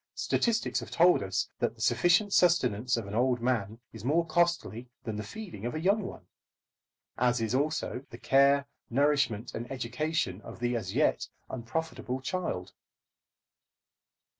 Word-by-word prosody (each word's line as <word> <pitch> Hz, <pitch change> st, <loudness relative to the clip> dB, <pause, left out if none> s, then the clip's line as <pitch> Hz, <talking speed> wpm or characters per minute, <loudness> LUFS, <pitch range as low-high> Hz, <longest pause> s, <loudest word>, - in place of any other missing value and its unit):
Statistics 230 Hz, -1 st, +1 dB
have -, -, -8 dB
told 175 Hz, +1 st, +5 dB
us 95 Hz, -1 st, -1 dB
that -, -, 0 dB
the -, -, -13 dB
sufficient 180 Hz, +4 st, +3 dB
sustenance 125 Hz, -, +3 dB
of 115 Hz, -, -3 dB
an 100 Hz, -, -7 dB
old 125 Hz, +2 st, +2 dB
man 115 Hz, -3 st, -1 dB
is 110 Hz, -2 st, -9 dB
more 160 Hz, +7 st, +2 dB
costly 165 Hz, -8 st, 0 dB
than 110 Hz, -3 st, -4 dB
the 105 Hz, -, -3 dB
feeding 190 Hz, -, -8 dB
of 120 Hz, +4 st, -3 dB
a -, -, -2 dB
young 200 Hz, +6 st, +2 dB
one, 190 Hz, -, -8 dB, 0.9 s
as 125 Hz, -1 st, +3 dB
is 115 Hz, 0 st, -1 dB
also 140 Hz, -2 st, -1 dB
the 115 Hz, -, -10 dB
care, 140 Hz, +2 st, +4 dB, 0.2 s
nourishment, 130 Hz, -4 st, +1 dB
and 120 Hz, +2 st, -6 dB
education 125 Hz, -, -2 dB
of -, -, -10 dB
the 120 Hz, 0 st, 0 dB
as 95 Hz, -5 st, -4 dB
yet -, -, +2 dB, 0.2 s
unprofitable 130 Hz, +1 st, -3 dB
child. 130 Hz, -, -3 dB
130 Hz, 150 wpm, -29 LUFS, 115-160 Hz, 0.9 s, told